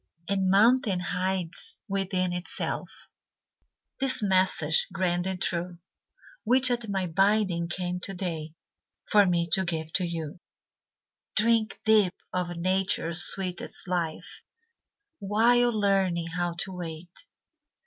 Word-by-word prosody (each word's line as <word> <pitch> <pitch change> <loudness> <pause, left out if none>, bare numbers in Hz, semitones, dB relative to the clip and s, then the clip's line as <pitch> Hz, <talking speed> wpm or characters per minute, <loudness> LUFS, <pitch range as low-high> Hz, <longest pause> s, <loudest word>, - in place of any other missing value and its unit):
A 200 - 0
mountain 200 +2 +3
hides 185 - -2
within 190 -2 -1
itself 180 +1 -5 0.9
This 265 -4 +5
message 185 -5 +2
grand 180 -1 -1
and 190 -1 -3
true, 175 0 -1 0.7
Which 255 +1 +4
at 240 -3 -2
my 195 -2 -1
bidding 190 -1 +1
came 180 0 -3
to 195 +2 -4
day 165 -4 -5 0.5
For 205 -2 +4
me 170 -1 +1
to 190 +3 +4
give 160 -2 -3
to 185 - +2
you: 165 -1 -6 1.0
"Drink 225 0 +1
deep 210 -4 +4 0.2
of 175 -1 -3
Nature's 180 -1 +1
sweetest 185 -1 -2
life, 170 -3 -3 0.8
While 235 +4 +3
learning 190 -4 +1
how 175 -1 -2
to 190 - -4
wait. 175 -1 -8
185 Hz, 115 wpm, -27 LUFS, 175-200 Hz, 1.0 s, This